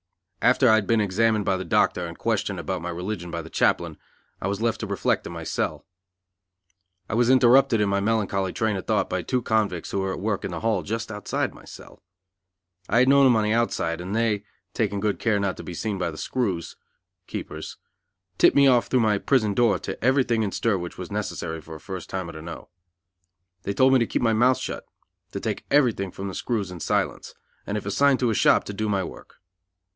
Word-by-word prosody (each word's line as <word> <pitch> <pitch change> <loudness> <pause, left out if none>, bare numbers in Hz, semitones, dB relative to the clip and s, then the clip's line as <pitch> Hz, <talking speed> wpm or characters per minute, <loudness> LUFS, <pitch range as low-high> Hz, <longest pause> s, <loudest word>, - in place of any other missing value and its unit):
After 130 +1 +4
I 110 - +6
had 110 -2 +2
been 115 -1 +3
examined 105 +1 +1
by 95 -1 +1
the 95 - -4
doctor 90 -1 +1
and 85 - -9
questioned 105 -4 -1
about 90 +2 -3
my 85 - -4
religion 90 +1 -4
by 85 -1 -4
the 80 - -11
chaplain, - - +1 0.4
I - - -1
was 100 +1 -2
left 115 0 0
to 110 - -4
reflect 100 -1 0
in - - -7
my - - -6
cell. - - -3 1.2
I - - -5
was 120 +1 +3
interrupted 130 -1 +5
in 105 - +2
my 100 0 +1
melancholy 100 -3 0
train 110 0 0
of 95 - -6
thought - - +1
by - - -2
two 125 -2 -1
convicts 105 -7 0
who 100 - -1
were 95 0 -1
at - - -6
work 105 0 -2
in - - -3
the 85 -2 -5
hall 110 -4 +1
just 110 +5 -4
outside 105 -1 -2
my - - -15
cell. - - -13 0.9
I 115 - +2
had 125 +2 +5
known 140 0 +6
them 125 -3 +5
on 110 - +2
the 105 +1 +1
outside, 90 -8 0
and 95 +4 -4
they, 110 -3 +1 0.3
taking 100 -3 -1
good 105 0 -1
care 110 -3 +1
not 100 -2 -1
to - - -8
be 90 - -7
seen 105 +1 -3
by 90 - -1
the 80 - -8
screws 95 -10 -2 0.5
(keepers) - - -6 0.6
tipped - - +5
me 140 - +6
off 125 -3 +4
through 130 - +2
my 105 -2 +2
prison 110 -6 +2
door 115 0 +3
to - - -7
everything 125 -3 +2
in 105 -3 -1
stir 105 -2 0
which 85 0 -7
was - - -7
necessary 80 0 -4
for 80 +1 -10
a - - -9
first 95 -1 -7
timer 95 -3 -4
to 80 - -9
know. 80 +1 -9 0.9
They 100 +1 -3
told 130 0 +5
me 130 - +6
to 115 - +1
keep - - -1
my 115 -1 +3
mouth 125 +4 +4
shut, - - -6 0.5
to - - -3
take - - -4
everything 120 -9 +2
from 95 +2 -6
the 95 - -5
screws 105 -5 -2
in 90 - -8
silence, - - -2 0.3
and 105 - -2
if 105 - -6
assigned 135 +7 +3
to 120 -2 +2
a - - +1
shop - - +4
to 100 - -7
do 110 +1 -2
my 100 -2 +1
work. - - -10
105 Hz, 225 wpm, -24 LUFS, 95-115 Hz, 1.2 s, I